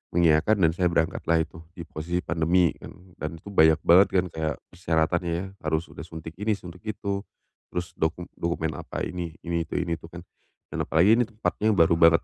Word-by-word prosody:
mengiayakan 85 +4 +4
dan 80 - +5
saya 90 +1 +1
berangkatlah 80 -1 +1
itu 80 +1 -12 0.2
di 85 - -7
posisi 85 +3 -3
pandemi 85 +1 +2
dan 90 0 -13
dan 80 +2 -4
itu 100 +5 -11
banyak 80 -4 +6
banget 95 +4 +7
kan, 90 0 +3
kayak 80 -2 -2 0.2
persyaratannya 85 0 0
ya 90 +3 -3
harus 80 +1 -1
udah - - -12
suntik 80 -1 -8
ini, 105 0 +1
suntik 90 -2 -11
itu, 100 -2 -2 0.5
terus 90 0 -3
doku 80 +2 0 0.2
dokumen 85 -2 -1
apa - - -5
ini, 85 -3 -4
ini 85 -2 -2
itu, - - -6
ini 85 -2 -1
itu 80 - -11
kan. 85 0 -10 0.5
Dan - - -2
apalagi 95 +8 +5
ini 120 - +2
tempatnya 110 -1 0
baru 85 -1 +5
banget. 85 0 +6
85 Hz, 190 wpm, -26 LUFS, 80-90 Hz, 0.5 s, banget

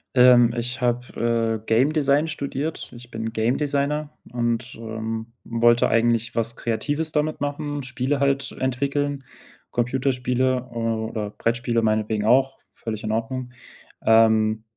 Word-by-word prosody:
Ähm, 125 -2 +7
ich 125 +2 -3
habe, 115 -2 0
äh, - - -28
Game 130 +7 +3
Design 145 +1 +2
studiert. 145 +1 -4
Ich 120 0 -13
bin 110 0 -4
Game 115 +3 +1
Designer 145 +1 -1 0.2
und, 120 +1 -2
ähm, 110 0 -5 0.2
wollte 120 0 +3
eigentlich 115 0 +1
was 115 0 -1
Kreatives 145 +7 -2
damit 155 0 -1
machen, 145 0 -3
Spiele 130 +2 -1
halt 140 0 +1
entwickeln, 140 +2 -1 0.5
Computerspiele, 125 0 0
äh, - - -14
oder 110 -2 -2
Brettspiele 115 0 0
meinetwegen 110 -1 0
auch, 135 +4 +3 0.2
völlig 110 -1 -6
in 110 - -2
Ordnung. 125 +3 -3 0.5
Ähm, 110 -1 +4
120 Hz, 130 wpm, -23 LUFS, 115-140 Hz, 0.5 s, Ähm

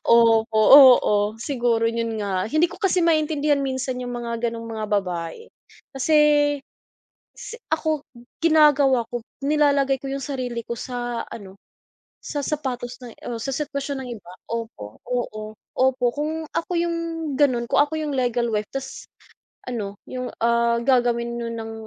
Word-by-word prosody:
Opo, 225 -1 +4 0.2
oo, 215 -6 +6
siguro 240 -5 +1
'yon 230 -1 -3
nga. 190 -2 -1
Hindi 310 +8 +2
ko 365 - -10
kasi 375 -3 +1
maintindihan 305 -3 +2
minsan 260 -1 -2
yung 245 0 -5
mga 235 0 -3
gano'ng 230 0 -6
mga 215 - -3
babae. 185 - -2 0.5
Kasi, 270 +4 +2 1.2
si 470 - -8
ako, 315 -2 0 0.4
ginagawa 295 -5 +5
ko, 240 - -2 0.2
nilalagay 280 -2 +2
ko - - -6
yung 275 0 -4
sarili 250 -4 -4
ko 235 - -4
sa 240 -2 -4
ano, 195 -3 -10 0.7
sa 290 - -4
sapatos 255 -5 -3
ng 240 - -9 0.2
o 235 - -3
sa 270 - -3
sitwasyon 280 -2 -3
ng 250 - -8
iba. 175 - -14 0.2
Opo, 225 - -6
oo, 215 -3 -3 0.2
opo, 260 -1 +2
kung 310 +2 -3
ako 335 - -2
yung, 340 0 0 0.4
gano'n, 255 -5 +3
kung - - +3
ako 295 +2 -5
yung 300 -2 -3
legal 245 -2 0
wife 210 -1 -1
tas 270 -1 -7 0.6
ano, 205 -5 -4
yung, 255 -1 -5
ah, 235 0 +2
gagawin 235 -2 +1
no'n 230 0 -4
ng, 225 0 -6
245 Hz, 150 wpm, -23 LUFS, 230-285 Hz, 1.2 s, oo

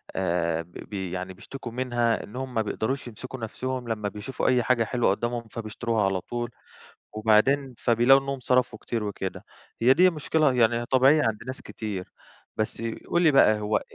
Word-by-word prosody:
آآ 85 -3 0
ب 85 +1 -15 0.2
ب - - -14
يعني 95 -1 -4
بيشتكوا 120 +6 -9
منها 120 -3 0
إنهّم 130 +4 -6
ما 115 - +1
بيقدروش 125 +5 -2
يمسكوا 130 +3 -8
نَفْسهم 125 +2 -4
لمّا 105 -2 -2
بيشوفوا 105 +6 -4
أي 125 -1 +3
حاجة 120 -1 +2
حلوة 120 +1 +1
قُدّامهم، 120 +3 -2
فبيشتروها 115 -1 -2
على 95 -1 0
طول 120 +3 -4 0.6
وبعدين 115 +6 +3
فبيلاقوا 120 +4 +5
إنّهم 140 -1 -3
صرفوا 125 -2 +1
كتير 115 -3 -3
وكده. 95 -2 -4 0.4
هي 125 +3 +6
دي 180 +5 +6
مشكلة 155 -3 +1
يعني 115 -1 +3
هي 120 0 -2
طبيعية 135 +4 +5
عند 110 -1 -1
ناس 130 - -6
كتير. 100 -4 -6 0.5
بس 110 +1 -2 0.3
قُل 175 - +2
لي 160 -4 +5
بقى، 110 -6 +5
هو 105 0 +1
أ - - -4
120 Hz, 175 wpm, -26 LUFS, 105-130 Hz, 0.6 s, هي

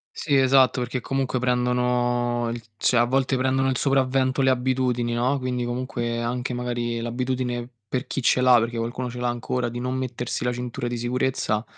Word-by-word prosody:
Sì 145 -3 0
esatto, 130 -2 +5
perché 125 +1 -2
comunque 135 0 -1
prendono 125 -1 +1
il 120 -1 -6
cioè, 120 - +2
a 120 - +6
volte 130 +1 +1
prendono 130 +1 +1
il 130 - 0
sopravvento 135 -1 +2
le 135 - +4
abitudini, 125 -2 +1
no, 125 +4 +1
quindi 125 -1 -2
comunque 120 -1 -2
anche 125 +1 -2
magari 120 -1 -2
l'abitudine, 125 0 -2 0.2
per 125 +3 -3
chi 135 - -3
ce 125 - +3
l'ha, 125 -1 +7
perché 115 +1 -1
qualcuno 120 +2 -3
ce 125 - -7
l'ha 125 - 0
ancora, 120 0 -2
di 120 +1 -5
non 125 +1 -2
mettersi 125 -2 -3
la 125 - +1
cintura 120 0 -4
di 120 0 -3
sicurezza, 120 -2 0
125 Hz, 185 wpm, -24 LUFS, 120-130 Hz, 0.2 s, l'ha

